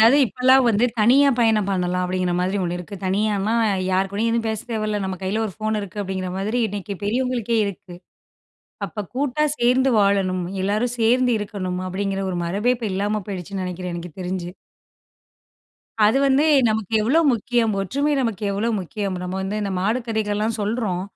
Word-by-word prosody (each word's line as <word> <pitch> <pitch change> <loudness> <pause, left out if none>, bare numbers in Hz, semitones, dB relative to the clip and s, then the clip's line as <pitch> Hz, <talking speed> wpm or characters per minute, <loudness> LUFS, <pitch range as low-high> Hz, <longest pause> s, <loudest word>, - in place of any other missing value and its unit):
அதாது 230 +6 +7
இப்பலாம் 255 +2 +4
வந்து 220 +1 +3
தனியா 260 +6 +5
பயணம் 220 -4 +3
பண்ணலாம் 180 -1 0
அப்படிங்கிற 180 0 -1
மாரி 185 +3 0
1 175 0 -2
இருக்கு. 180 +3 -8
தனியான்னா, 205 +2 0 0.4
யாருக்கூடையும் 195 +4 0
எதுவும் 230 -1 0
பேச 220 -1 -2
தேவையில்ல. 215 -2 -1
நம்ம 190 -1 -3
கையில 205 +4 -1
ஒரு 195 - -7
ஃபோன் 215 0 -1
இருக்கு 205 +1 -6
அப்படிங்கிற 190 -1 -4
மாரி, 215 +6 -1
இன்னக்கு 200 0 -5
பெரியவங்களுக்கே 235 0 0
இருக்கு. 195 -2 -8 0.9
அப்போ 215 - -6
கூட்டா 285 +2 0
சேர்ந்து 255 +2 +3
வாழணும், 195 -3 +2 0.2
எல்லாரும் 215 +5 0
சேர்ந்து 245 +3 +3
இருக்கணும், 190 -3 -4
அப்படிங்கிற 195 +1 -2
ஒரு 180 - -3
மரபே 205 +8 +1
இப்ப 235 -2 -4
இல்லாம 205 +2 -1
போயிடுச்சுன்னு 190 0 -5
நெனக்கிறேன், 180 -1 -5
எனக்கு 175 -1 -7
தெரிஞ்சு. 180 -1 -3 1.6
அது 225 +6 +3
வந்து 275 +2 +3 0.2
நமக்கு 215 -2 -2
எவ்வளோ 270 +10 +3
முக்கியம், 230 0 +1
ஒற்றுமை 280 +10 0
நமக்கு 225 -6 -2
எவ்வளோ 205 +4 -1
முக்கியம், 195 +2 -4
நம்ம 180 +1 -4
வந்து 195 +2 -3
இந்த 200 - -2
மாடு 215 +6 +1
கதைகள்லாம் 215 0 -1
சொல்றோம், 205 -4 -1
205 Hz, 160 wpm, -22 LUFS, 190-230 Hz, 1.6 s, அதாது